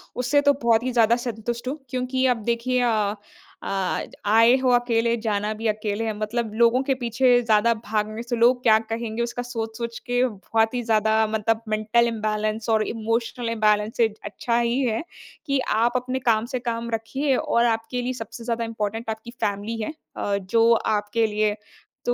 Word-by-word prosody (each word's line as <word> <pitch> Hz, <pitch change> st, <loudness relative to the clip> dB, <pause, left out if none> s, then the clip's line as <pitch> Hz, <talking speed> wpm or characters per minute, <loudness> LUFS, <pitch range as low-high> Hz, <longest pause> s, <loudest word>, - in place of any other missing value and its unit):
उससे 255 Hz, +4 st, +2 dB
तो 285 Hz, 0 st, +4 dB
बहुत 230 Hz, -1 st, +3 dB
ही 255 Hz, -, -1 dB
ज़्यादा 235 Hz, -1 st, +4 dB
संतुष्ट 235 Hz, 0 st, -4 dB
हूँ, 275 Hz, +4 st, -2 dB
क्योंकि 255 Hz, +1 st, -1 dB
अब 225 Hz, -, -9 dB
देखिए 240 Hz, +2 st, 0 dB
अ, 215 Hz, -3 st, +1 dB, 0.5 s
आज 190 Hz, -2 st, -2 dB
आए 230 Hz, +3 st, +6 dB
हो 255 Hz, -, +3 dB
अकेले, 235 Hz, -1 st, +2 dB
जाना 215 Hz, -1 st, -1 dB
भी 225 Hz, -, -1 dB
अकेले 215 Hz, 0 st, -1 dB
है, 220 Hz, -, -1 dB
मतलब 220 Hz, +1 st, -2 dB
लोगों 235 Hz, +2 st, +4 dB
के 270 Hz, 0 st, +1 dB
पीछे 245 Hz, 0 st, +2 dB
ज़्यादा 230 Hz, 0 st, +3 dB
भागने 215 Hz, +1 st, -2 dB
से 240 Hz, 0 st, -2 dB
लोग 245 Hz, +2 st, +4 dB
क्या 220 Hz, -2 st, +6 dB
कहेंगे 225 Hz, 0 st, -4 dB
उसका 240 Hz, +1 st, -4 dB
सोच-सोच 230 Hz, -1 st, -5 dB
के 245 Hz, 0 st, +2 dB
बहुत 220 Hz, +1 st, -1 dB
ही 245 Hz, -, -1 dB
ज़्यादा 220 Hz, -1 st, +2 dB
मतलब 220 Hz, +1 st, 0 dB
मेंटल 215 Hz, +2 st, +2 dB
इम्बैलेंस 215 Hz, 0 st, -2 dB
और 220 Hz, -1 st, +3 dB
इमोशनल 230 Hz, +1 st, -2 dB
इम्बैलेंस 215 Hz, -1 st, +1 dB
से 230 Hz, -, +4 dB, 0.2 s
अच्छा 235 Hz, -1 st, -1 dB
ही 235 Hz, +2 st, +1 dB
है 235 Hz, 0 st, 0 dB, 0.4 s
कि 275 Hz, -3 st, +1 dB, 0.2 s
आप 235 Hz, +2 st, +2 dB
अपने 255 Hz, +1 st, -1 dB
काम 220 Hz, 0 st, +2 dB
से 255 Hz, -, 0 dB
काम 230 Hz, 0 st, -3 dB
रखिए 265 Hz, +5 st, 0 dB
और 235 Hz, -1 st, +1 dB
आपके 225 Hz, +2 st, -1 dB
लिए 250 Hz, +1 st, -2 dB
सबसे 225 Hz, 0 st, -8 dB
ज़्यादा 230 Hz, 0 st, -2 dB
इम्पोर्टेंट 225 Hz, 0 st, -4 dB
आपकी 220 Hz, +2 st, -6 dB
फैमिली 210 Hz, 0 st, -3 dB
है 215 Hz, -, -3 dB, 0.3 s
अ, 200 Hz, -1 st, 0 dB
जो 225 Hz, +4 st, +2 dB
आपके 215 Hz, 0 st, 0 dB
लिए 210 Hz, 0 st, 0 dB, 0.5 s
तो 245 Hz, -, +2 dB
230 Hz, 180 wpm, -24 LUFS, 215-240 Hz, 0.5 s, आए